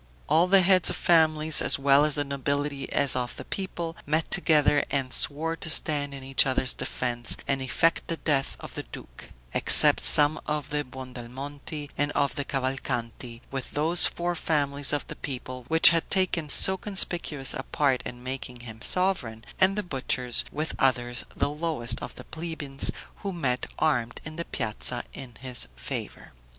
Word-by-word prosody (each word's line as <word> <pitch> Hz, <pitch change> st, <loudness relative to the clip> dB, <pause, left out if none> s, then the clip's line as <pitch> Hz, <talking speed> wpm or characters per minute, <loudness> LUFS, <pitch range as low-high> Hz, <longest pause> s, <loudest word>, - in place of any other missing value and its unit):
All 165 Hz, +3 st, +3 dB
the 190 Hz, 0 st, +5 dB
heads 185 Hz, -1 st, +4 dB
of -, -, -3 dB
families, 155 Hz, -2 st, +4 dB
as -, -, +5 dB
well 140 Hz, +1 st, +4 dB
of 150 Hz, -1 st, +1 dB
the 145 Hz, -, +1 dB
nobility 140 Hz, 0 st, -3 dB
as 140 Hz, -3 st, +2 dB
of 125 Hz, -1 st, -3 dB
the -, -, -9 dB
people, 175 Hz, -4 st, -5 dB
met 155 Hz, +2 st, 0 dB
together, 150 Hz, -5 st, +3 dB
and 135 Hz, -3 st, -1 dB
swore 160 Hz, +3 st, -1 dB
to 165 Hz, -, -2 dB
stand 145 Hz, -3 st, +1 dB
in 135 Hz, -, -10 dB
each 135 Hz, 0 st, +4 dB
other's 130 Hz, -1 st, +1 dB
defense, 120 Hz, -1 st, -2 dB
and 135 Hz, -1 st, -1 dB
effect 165 Hz, +6 st, 0 dB
the 165 Hz, -, -2 dB
death 140 Hz, -4 st, -1 dB
of -, -, -10 dB
the -, -, -5 dB
duke; -, -, -12 dB, 0.2 s
except -, -, +7 dB
some 150 Hz, +1 st, +5 dB
of 150 Hz, -1 st, -3 dB
the 150 Hz, 0 st, -1 dB
Buondelmonti 135 Hz, +3 st, -8 dB
and 145 Hz, 0 st, 0 dB
of 140 Hz, -1 st, 0 dB
the 140 Hz, -, -3 dB
Cavalcanti, 125 Hz, -3 st, -4 dB
with 135 Hz, -2 st, -6 dB
those 160 Hz, +4 st, +3 dB
four 175 Hz, 0 st, -3 dB
families 145 Hz, -4 st, 0 dB
of 145 Hz, -1 st, -2 dB
the -, -, -8 dB
people 130 Hz, -2 st, -7 dB
which 160 Hz, 0 st, +8 dB
had 165 Hz, -1 st, -1 dB
taken 180 Hz, -5 st, 0 dB
so 190 Hz, +6 st, +5 dB
conspicuous 175 Hz, -8 st, 0 dB
a 135 Hz, -, -4 dB
part 135 Hz, -1 st, 0 dB
in 120 Hz, 0 st, -9 dB
making 125 Hz, -1 st, -6 dB
him 115 Hz, -2 st, -11 dB
sovereign, 125 Hz, -10 st, -1 dB
and 190 Hz, +1 st, +3 dB
the 210 Hz, -, -1 dB
butchers, 130 Hz, -5 st, +1 dB
with 155 Hz, +1 st, -3 dB
others, 120 Hz, -2 st, 0 dB
the -, -, 0 dB
lowest 150 Hz, -7 st, -3 dB
of -, -, -8 dB
the -, -, -10 dB
plebeians, 160 Hz, -4 st, -2 dB, 0.3 s
who 200 Hz, -, -5 dB
met 135 Hz, -8 st, -2 dB
armed 120 Hz, -7 st, 0 dB
in 155 Hz, 0 st, -7 dB
the 170 Hz, -, -4 dB
piazza 120 Hz, +1 st, -1 dB
in 125 Hz, -3 st, -10 dB
his 125 Hz, -, -4 dB
favor. -, -, -7 dB
145 Hz, 175 wpm, -26 LUFS, 130-160 Hz, 0.3 s, which